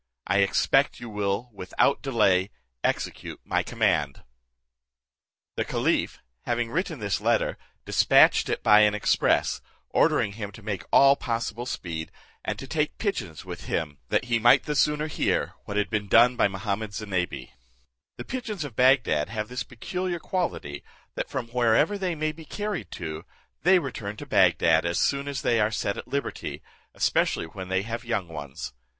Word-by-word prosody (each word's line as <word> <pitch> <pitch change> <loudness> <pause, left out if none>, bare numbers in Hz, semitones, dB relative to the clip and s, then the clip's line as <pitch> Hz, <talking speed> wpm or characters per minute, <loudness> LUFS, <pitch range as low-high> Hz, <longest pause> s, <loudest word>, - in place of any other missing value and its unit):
I 100 +2 +2
expect 100 0 +2
you 120 - -8
will 105 +4 -2
without 100 +8 +1
delay 100 -8 +2 0.3
execute - - -2
my - - +1
command." 70 -2 0 1.3
The - - +1
caliph - - -1 0.2
having 120 -1 -1
written 170 -1 -2
this 100 -4 -2
letter, - - +1 0.3
dispatched - - +5
it - - -2
by 105 0 +7
an 105 0 +4
express, 105 - +1 0.3
ordering 100 - +3
him 105 -1 -6
to 110 - -13
make 100 -5 -4
all 140 0 +7
possible 120 -1 -3
speed, 80 -7 -5 0.3
and - - -3
to - - -7
take 150 +2 -1
pigeons 110 - -3
along - - -15
with - - -7
him, 75 -5 -3
that - - +1
he 120 -1 +1
might 120 +4 +6
the 150 - -2
sooner 150 +1 +2
hear 155 - -1
what 100 - -4
had 105 - 0
been 105 -2 -1
done 120 +4 +6
by 120 - +3
Mahummud 100 +2 -4
Zinebi. 90 -11 -3 0.6
The - - -7
pigeons 225 -9 -4
of 140 -6 -8
Bagdad 125 - +3
have 110 0 -4
this 125 0 -4
peculiar 180 +9 -4
quality, 165 - -3 0.3
that - - -4
from 125 -3 -4
wherever 125 - +3
they 185 -4 -2
may 155 0 -1
be 160 +1 -12
carried 205 - -4
to, 80 -2 -6 0.4
they 185 +6 +5
return 115 - -4
to 145 - -7
Bagdad 85 - +4
as 85 0 0
soon 140 0 +1
as 140 -1 -4
they 120 -1 +2
are 105 0 +3
set 105 -2 -2
at - - -8
liberty, 140 0 -4 0.3
especially - - +1
when 95 +3 -8
they 95 +1 0
have 115 +2 -5
young 115 -7 -2
ones. 70 -6 -7
110 Hz, 170 wpm, -26 LUFS, 95-140 Hz, 1.3 s, by